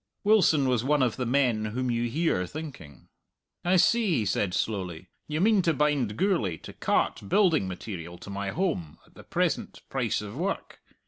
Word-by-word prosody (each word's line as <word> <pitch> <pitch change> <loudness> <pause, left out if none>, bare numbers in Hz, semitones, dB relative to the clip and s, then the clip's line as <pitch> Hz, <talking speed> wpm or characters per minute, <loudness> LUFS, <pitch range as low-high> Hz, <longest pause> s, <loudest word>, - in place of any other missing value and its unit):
Wilson 185 -10 +4
was 125 -3 +1
one 145 +1 +3
of 120 -4 +1
the 125 -2 -2
men 120 -4 +2
whom 125 +4 -2
you 120 0 0
hear 130 - 0
thinking. 135 - -9 0.6
"I 180 +2 +3
see," 210 0 +4
he 110 - 0
said 95 -2 0
slowly. 95 -5 -3 0.2
"You 150 +1 -2
mean 210 0 +4
to 165 -3 +1
bind 135 -7 +1
Gourlay 170 - +1
to - - -9
cart 100 - 0
building 170 - +3
material 90 -2 -7
to 100 - -10
my 100 0 -3
holm 145 - -2
at - - -25
the - - -13
present - - -2
price - - 0
of 105 +1 -7
work. 185 +7 -3
125 Hz, 180 wpm, -27 LUFS, 100-160 Hz, 0.6 s, Wilson